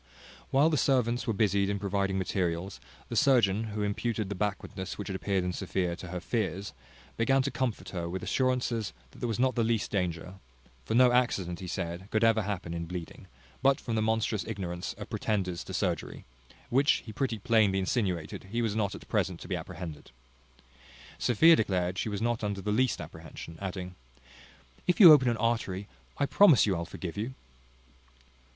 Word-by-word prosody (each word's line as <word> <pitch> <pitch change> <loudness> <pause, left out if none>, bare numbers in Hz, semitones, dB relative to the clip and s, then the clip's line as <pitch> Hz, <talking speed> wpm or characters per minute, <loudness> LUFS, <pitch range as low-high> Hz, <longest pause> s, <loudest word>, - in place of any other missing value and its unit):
While 145 +4 +4
the 150 - +2
servants 125 -3 +1
were 115 - +1
busied 100 -1 +2
in 100 - 0
providing 100 -1 -1
materials, 90 0 -2 0.3
the - - -4
surgeon, 115 -6 +3
who 105 -1 -3
imputed 105 0 -2
the - - -2
backwardness 100 -1 -4
which 105 - -5
had 95 - -3
appeared 95 -1 0
in 90 0 -2
Sophia 90 -1 -2
to 90 - -8
her 90 +1 -4
fears, 100 -1 -2 0.4
began 135 +4 +3
to 140 - -2
comfort 120 -2 -2
her 85 -2 -4
with 95 +1 -4
assurances 125 -4 0 0.2
that - - -16
there 120 - -2
was 115 - -2
not 130 +1 +2
the 120 - +1
least 115 -1 0
danger; 90 -1 -2 0.5
for 110 - -1
no 125 0 +6
accident, 100 -8 +1
he 95 - -6
said, 90 +1 -4
could 110 0 +1
ever 115 -1 +4
happen 95 -4 -4
in 85 0 -3
bleeding, 90 -1 -7 0.3
but 135 0 +4
from 115 - -4
the 110 - +1
monstrous 110 -1 0
ignorance 90 -5 -4
of - - -9
pretenders 95 -5 -2
to - - -8
surgery, - - -2 0.5
which 135 +4 +3
he 110 - -8
pretty 130 -3 -1
plainly 110 -3 +3
insinuated 95 -3 -2
was 115 -3 0
not 105 -3 0
at - - -11
present - - 0
to - - -10
be - - -1
apprehended. 80 -4 -7 1.1
Sophia 160 +8 +6
declared 95 - 0
she 110 - -1
was 105 +1 -3
not 120 -1 0
under 100 -1 -2
the 105 - -2
least 125 +4 +2
apprehension; 85 - -9
adding, 90 -1 -5 0.9
"If 180 - +2
you 175 -7 +12
open 130 -4 +5
an 115 - 0
artery, 110 -4 -1 0.3
I 145 - +2
promise 165 - +6
you 100 -3 +1
I'll 85 0 -3
forgive 85 +2 -7
you." 115 +5 -3
105 Hz, 185 wpm, -29 LUFS, 95-120 Hz, 1.1 s, you